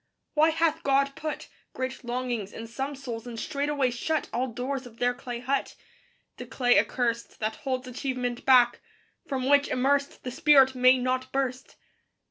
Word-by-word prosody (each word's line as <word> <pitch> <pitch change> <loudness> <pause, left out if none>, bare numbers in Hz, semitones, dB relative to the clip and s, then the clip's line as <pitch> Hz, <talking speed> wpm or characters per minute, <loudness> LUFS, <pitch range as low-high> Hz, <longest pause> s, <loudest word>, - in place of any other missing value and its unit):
Why 310 +1 +5
hath 325 0 +1
God 275 -1 +2
put 310 -1 -5 0.3
Great 260 0 -4
longings 240 -4 -3
in 225 - -7
some 270 +5 -4
souls 245 -4 -7
and 230 -2 -6
straightway 280 -1 0
shut 300 +6 -2
All 255 +2 0
doors 255 +2 -4
of 230 -1 -16
their 245 +1 +1
clay 245 -1 -7
hut? 270 +3 -1 0.6
The - - -8
clay 245 -5 +3
accurst 235 +2 -1
That 220 0 -2
holds 260 -2 -3
achievement 250 -1 -3
back; 250 -2 +5 0.5
from 260 -2 -2
which, 285 0 +4
immersed, 280 +2 0
The 250 - -4
spirit 270 0 +5
may 255 0 +5
not 255 +1 -1
burst. 265 -1 -3
255 Hz, 160 wpm, -27 LUFS, 245-275 Hz, 0.6 s, Why